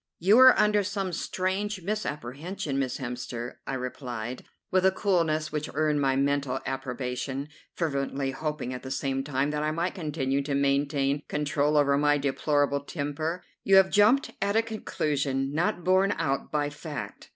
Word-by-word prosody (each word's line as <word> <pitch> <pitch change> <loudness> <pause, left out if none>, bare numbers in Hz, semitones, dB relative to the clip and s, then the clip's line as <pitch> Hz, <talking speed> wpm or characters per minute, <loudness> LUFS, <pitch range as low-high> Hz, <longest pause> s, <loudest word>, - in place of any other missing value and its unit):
"You 200 +7 +5
are 260 -1 +9
under 210 -1 +3
some 195 -2 -3
strange 190 +3 -2
misapprehension, 150 - -3
Miss 130 -2 -1
Hemster," 125 -1 -5
I 135 - -2
replied, 125 -2 -5 0.3
with 185 0 +3
a 190 - +6
coolness 165 -6 +1
which 150 0 -3
earned 150 -1 +2
my 135 -1 +2
mental 140 -1 0
approbation, 135 +1 -3 0.3
fervently 140 -4 -1
hoping 150 -2 -3
at 125 - -6
the 130 - -7
same 135 0 -1
time 140 +1 0
that 150 0 -2
I 155 - 0
might 170 +3 -1
continue 145 -5 -1
to 140 0 -2
maintain 140 0 +1
control 150 0 +1
over 140 -1 +4
my 145 0 +3
deplorable 140 0 +1
temper; 155 +4 -3 0.2
"you 195 - +4
have 190 0 +6
jumped 215 +7 +4
at 200 +1 +1
a 225 - +4
conclusion 145 -11 -2
not 175 +2 0
borne 190 +3 +3
out 140 -4 -2
by 145 -1 0
fact. 150 -1 -7
145 Hz, 160 wpm, -27 LUFS, 135-175 Hz, 0.3 s, are